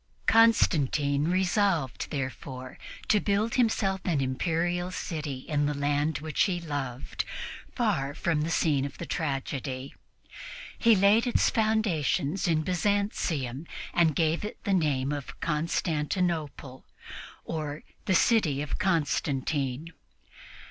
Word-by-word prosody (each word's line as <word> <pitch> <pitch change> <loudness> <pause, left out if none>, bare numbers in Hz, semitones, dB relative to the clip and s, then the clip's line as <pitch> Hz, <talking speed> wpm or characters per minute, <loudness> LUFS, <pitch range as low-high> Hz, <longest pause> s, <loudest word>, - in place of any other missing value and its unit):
Constantine 150 - +4
resolved, 180 - +1
therefore, 130 -1 -5 0.3
to 210 - +4
build 205 +3 0
himself 200 -6 +1
an 165 -6 +1
Imperial 170 +7 0
city 150 -7 -4
in 145 +1 0
the 150 - -1
land 145 +2 0
which 155 0 -2
he 185 -4 -1
loved, 140 -6 -4 0.5
far 160 - 0
from 160 -3 0
the 155 - -1
scene 150 -4 +2
of 140 -1 -5
the - - -5
tragedy. 135 -3 -3 0.9
He 230 -2 +6
laid 205 +5 +4
its 245 - +3
foundations 195 - +1
in 160 -2 +2
Byzantium 170 - -1 0.3
and 165 -4 +3
gave 165 +1 +1
it 210 - -5
the 200 - 0
name 145 -6 +1
of 145 -2 -6
Constantinople, 155 -3 -1 0.6
or 155 -2 -4 0.2
the 190 - +2
city 165 - +3
of 150 - -4
Constantine. 150 -4 0
160 Hz, 115 wpm, -28 LUFS, 140-185 Hz, 0.9 s, He